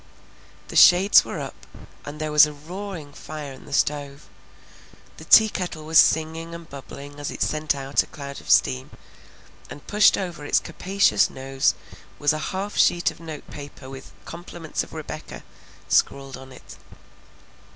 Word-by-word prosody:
The -, -, -8 dB
shades 190 Hz, +3 st, +7 dB
were -, -, -6 dB
up, -, -, -9 dB, 0.4 s
and 145 Hz, +1 st, -8 dB
there 155 Hz, 0 st, -3 dB
was 150 Hz, 0 st, +7 dB
a 150 Hz, -, -8 dB
roaring 165 Hz, 0 st, -8 dB
fire 150 Hz, -2 st, -8 dB
in 130 Hz, -, -14 dB
the 145 Hz, -, -13 dB
stove; 140 Hz, 0 st, -1 dB, 0.9 s
the -, -, -11 dB
teakettle 180 Hz, -7 st, +4 dB
was 160 Hz, 0 st, +5 dB
singing 160 Hz, +1 st, +1 dB
and 170 Hz, -1 st, -11 dB
bubbling 140 Hz, 0 st, -10 dB
as 145 Hz, -, -4 dB
it -, -, -2 dB
sent 155 Hz, -1 st, -1 dB
out 135 Hz, 0 st, 0 dB
a -, -, -9 dB
cloud 140 Hz, -1 st, -9 dB
of -, -, -14 dB
steam, 65 Hz, 0 st, +3 dB, 0.8 s
and 145 Hz, -, -11 dB
pushed 210 Hz, +1 st, +4 dB
over 175 Hz, -6 st, -5 dB
its 145 Hz, -, +2 dB
capacious 190 Hz, -, +1 dB
nose 135 Hz, 0 st, 0 dB, 0.4 s
was 145 Hz, 0 st, +2 dB
a 155 Hz, -, -3 dB
half 195 Hz, +2 st, -4 dB
sheet 175 Hz, 0 st, +3 dB
of -, -, -16 dB
note 160 Hz, -3 st, -9 dB
paper 140 Hz, -2 st, -10 dB
with 135 Hz, 0 st, -11 dB
"Compliments 170 Hz, -1 st, -6 dB
of -, -, -14 dB
Rebecca" -, -, -8 dB, 0.4 s
scrawled 135 Hz, -1 st, +1 dB
on 130 Hz, 0 st, -12 dB
it. 130 Hz, -, -13 dB
150 Hz, 160 wpm, -23 LUFS, 140-170 Hz, 0.9 s, shades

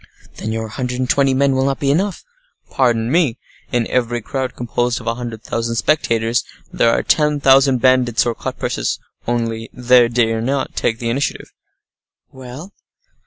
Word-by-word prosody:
"Then 110 Hz, -, -4 dB
your 110 Hz, 0 st, -3 dB
hundred 125 Hz, +3 st, -4 dB
and 130 Hz, 0 st, -1 dB
twenty 135 Hz, 0 st, +2 dB
men 140 Hz, 0 st, +3 dB
will 130 Hz, 0 st, +1 dB
not 135 Hz, 0 st, -1 dB
be 140 Hz, -1 st, +1 dB
enough." 190 Hz, +6 st, -1 dB, 0.5 s
"Pardon 120 Hz, -3 st, +1 dB
me. 155 Hz, -7 st, +2 dB, 0.3 s
In 120 Hz, -1 st, +1 dB
every 120 Hz, -1 st, 0 dB
crowd 130 Hz, +3 st, -4 dB
composed 120 Hz, 0 st, -1 dB
of -, -, -12 dB
a 115 Hz, -, 0 dB
hundred 115 Hz, -2 st, -7 dB
thousand 115 Hz, 0 st, -2 dB
spectators, 115 Hz, -4 st, +1 dB, 0.3 s
there 115 Hz, -, +3 dB
are -, -, +1 dB
ten 150 Hz, -1 st, +2 dB
thousand 135 Hz, -2 st, +4 dB
bandits 130 Hz, -3 st, +3 dB
or 120 Hz, -, 0 dB
cut -, -, -6 dB
purses—only 115 Hz, -1 st, -3 dB
they 125 Hz, -1 st, +4 dB
dare 115 Hz, -1 st, +1 dB
not 135 Hz, +3 st, -2 dB
take 115 Hz, -, 0 dB
the 115 Hz, 0 st, -2 dB
initiative." 140 Hz, +4 st, -3 dB, 0.8 s
"Well?" 130 Hz, +9 st, -10 dB
125 Hz, 165 wpm, -18 LUFS, 115-135 Hz, 0.8 s, thousand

